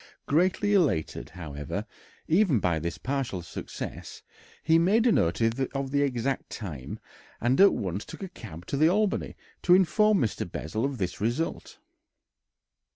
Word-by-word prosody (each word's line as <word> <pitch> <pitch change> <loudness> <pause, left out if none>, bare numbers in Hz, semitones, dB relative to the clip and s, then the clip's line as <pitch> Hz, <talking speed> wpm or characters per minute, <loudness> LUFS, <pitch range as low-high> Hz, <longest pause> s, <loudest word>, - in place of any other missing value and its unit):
Greatly 185 +7 +2
elated, 150 - +1
however, 75 -5 -5 0.4
even 165 - +3
by 85 -4 +1
this 85 +2 -4
partial 130 -10 -3
success, - - -7 0.4
he 160 +1 +4
made 205 +7 +3
a 240 - +5
note 85 - +2
of 135 +4 -1
the 140 0 +2
exact 135 -1 -1
time, 75 - -6 0.4
and 125 +8 +2
at 200 - +7
once 95 +1 -3
took - - -9
a 190 - -5
cab 90 - -10
to 140 - -3
the 155 +3 +5
Albany 205 +2 0 0.3
to 180 - +6
inform 210 +3 +4
Mr. 115 - -1
Bessel 110 - -2
of 140 -1 -2
this 90 -2 -3
result. 120 +10 -2
135 Hz, 150 wpm, -27 LUFS, -, 0.4 s, at